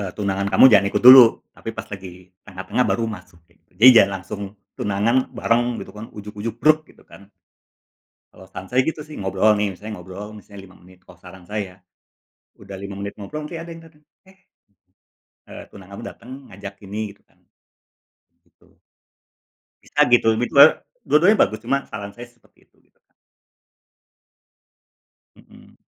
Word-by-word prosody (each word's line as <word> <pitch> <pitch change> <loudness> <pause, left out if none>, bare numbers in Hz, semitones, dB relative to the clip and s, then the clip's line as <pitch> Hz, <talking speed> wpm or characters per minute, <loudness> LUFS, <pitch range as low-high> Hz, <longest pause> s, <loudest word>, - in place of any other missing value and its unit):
eee, 95 -3 -5
tunangan 100 -1 -2
kamu - - +6
jangan 100 -3 +5
ikut - - -1
dulu. 130 -1 +11 0.3
Tapi - - -7
pas 110 - -7
lagi 95 -2 -8 0.3
tengah-tengah 95 +6 -3
baru 115 - 0
masukin. 85 -2 -21 0.2
Jadi 110 +7 +4
jangan 100 -3 +6
langsung 95 +3 -8 0.4
tunangan 105 +4 0 0.2
bareng 120 +1 -1
gitu - - -10
kan 110 +2 -8
ujug-ujug 105 +2 -7
bruk 155 0 +4
gitu - - -23
kan. 100 +1 -17 1.0
Kalau - - -16
saran 95 - -10
saya 125 - +2
gitu 160 -1 -3
sih 150 0 -12
ngobrol 95 +2 +1
nih, 105 -1 -1
misalnya 105 +4 -9
ngobrol 95 +4 -10
misalnya 100 -1 -13
5 90 -1 -18
menit 90 0 -21
kalau 90 - -17
saran 90 0 -15
saya. 105 -3 -5 0.8
Udah 100 -1 -11
5 100 +1 -8
menit 100 0 -6
ngobrol, 150 +9 -8
nanti 165 - -8
ada 170 - -10
yang 165 0 -11
datang, 155 -2 -22 0.2
Eh 190 0 -23 1.0
eee, - - -11
tunangan 100 0 -13
kamu - - -10
datang 125 - -14 0.2
ngajak 100 +1 -10
ini 105 0 -5
gitu - - -29
kan. - - -35 1.0
Betul. - - -30 1.1
Bisa 145 - -3
gitu, 120 -2 +4
bi 120 - 0 0.2
e - - +12 0.4
dua-duanya 180 +8 +4
bagus, 110 0 -6
cuma 135 +4 0
saran 100 -2 -7
saya 120 - -9
seperti 120 - -32
itu - - -41
gitu - - -47
kan. - - -48 2.2
Mhm. - - -20
105 Hz, 160 wpm, -21 LUFS, 95-120 Hz, 2.2 s, e